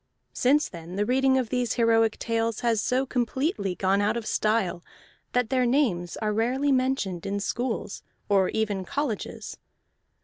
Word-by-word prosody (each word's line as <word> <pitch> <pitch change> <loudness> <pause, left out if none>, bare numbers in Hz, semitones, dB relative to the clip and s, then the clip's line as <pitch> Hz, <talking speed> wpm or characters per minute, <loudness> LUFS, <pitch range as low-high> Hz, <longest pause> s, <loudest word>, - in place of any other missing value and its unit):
Since 285 +4 +3
then 170 +1 -9
the 205 +1 0
reading 265 +2 +3
of 250 -4 -1
these 250 -2 0
heroic 225 -2 +3
tales 230 -1 -1
has 230 -3 +1
so 255 +2 +1
completely 245 - -1
gone 195 +2 +1
out 205 +3 +1
of 230 - -5
style 215 -5 0 0.5
that 250 -3 +1
their 255 -1 +3
names 220 - +1
are 210 -1 -1
rarely 255 +6 +1
mentioned 255 -9 0
in 200 +1 -1
schools 230 +1 -3 0.3
or 195 -2 +3
even 210 -3 -1
colleges. 260 +2 -4
225 Hz, 150 wpm, -26 LUFS, 200-255 Hz, 0.5 s, Since